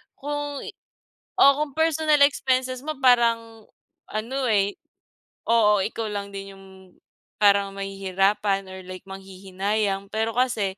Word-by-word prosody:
kung 290 Hz, 0 st, -4 dB, 0.8 s
oo 280 Hz, -, +8 dB
kung 295 Hz, -3 st, -2 dB
personal 315 Hz, -2 st, +2 dB
expenses 260 Hz, -2 st, +1 dB
mo 310 Hz, +1 st, -4 dB
parang, 230 Hz, -3 st, +2 dB, 0.4 s
ano 255 Hz, +5 st, -3 dB
eh, 200 Hz, -1 st, +1 dB, 0.7 s
oo, 210 Hz, -3 st, +4 dB
ikaw 225 Hz, +1 st, -3 dB
lang 200 Hz, -1 st, -4 dB
din 195 Hz, 0 st, -8 dB
yung 195 Hz, -, -15 dB, 0.7 s
parang 200 Hz, -1 st, +3 dB
mahihirapan 195 Hz, +1 st, 0 dB
or 190 Hz, -, -8 dB
like 185 Hz, 0 st, -9 dB
manghihinayang 195 Hz, +1 st, -3 dB
pero 220 Hz, +1 st, -1 dB
kasi, 225 Hz, -7 st, 0 dB
215 Hz, 115 wpm, -24 LUFS, 195-255 Hz, 0.8 s, oo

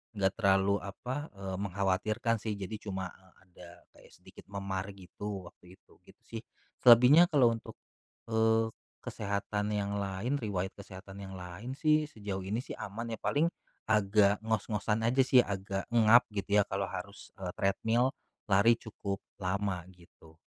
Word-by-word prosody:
nggak 95 Hz, -1 st, +2 dB
terlalu, 100 Hz, -1 st, +3 dB
apa, 125 Hz, +9 st, -5 dB
eee, 95 Hz, -1 st, -5 dB
mengkhawatirkan 100 Hz, +4 st, 0 dB
sih. 105 Hz, 0 st, -3 dB
Jadi 100 Hz, +2 st, -6 dB
cuma, 95 Hz, -2 st, -3 dB
eee, 95 Hz, -1 st, -22 dB
ada 90 Hz, -1 st, -14 dB, 0.2 s
kayak -, -, -19 dB
sedikit -, -, -16 dB
memar 100 Hz, -1 st, -4 dB
gitu 100 Hz, +1 st, -7 dB
waktu 90 Hz, +1 st, -18 dB
itu. -, -, -26 dB
Gitu -, -, -19 dB
sih. -, -, -7 dB, 0.4 s
Selebihnya 125 Hz, +8 st, +8 dB
kalau 135 Hz, -8 st, +4 dB
untuk, 115 Hz, -1 st, -6 dB, 0.5 s
eee, 110 Hz, 0 st, +3 dB, 0.3 s
kesehatan 105 Hz, 0 st, -3 dB
yang 100 Hz, -1 st, -1 dB
lain, 100 Hz, +6 st, -2 dB
riwayat 100 Hz, -7 st, -3 dB
kesehatan 100 Hz, 0 st, -10 dB
yang 95 Hz, -, -8 dB
lain 90 Hz, +8 st, -7 dB
sih, 155 Hz, -1 st, +2 dB
sejauh 100 Hz, -5 st, -5 dB
ini 105 Hz, +5 st, -2 dB
sih -, -, -7 dB
aman 115 Hz, +4 st, -6 dB
ya. -, -, -20 dB
Paling 150 Hz, +4 st, +2 dB, 0.4 s
agak 105 Hz, 0 st, +3 dB
ngos-ngosan 110 Hz, 0 st, 0 dB
aja 130 Hz, +3 st, +4 dB
sih, 130 Hz, 0 st, +5 dB
agak 100 Hz, -3 st, -1 dB
engap 115 Hz, +1 st, +6 dB
gitu 100 Hz, +1 st, +2 dB
ya 100 Hz, -, +2 dB
kalau 100 Hz, 0 st, -1 dB
harus, 100 Hz, +2 st, -8 dB
eee, 90 Hz, -2 st, -4 dB
treadmill, 110 Hz, +5 st, +1 dB, 0.4 s
lari 100 Hz, +5 st, +6 dB
cukup 100 Hz, -4 st, -6 dB, 0.2 s
lama. 95 Hz, -1 st, -1 dB
Gitu. 85 Hz, -3 st, -19 dB
100 Hz, 150 wpm, -31 LUFS, 95-115 Hz, 0.5 s, Selebihnya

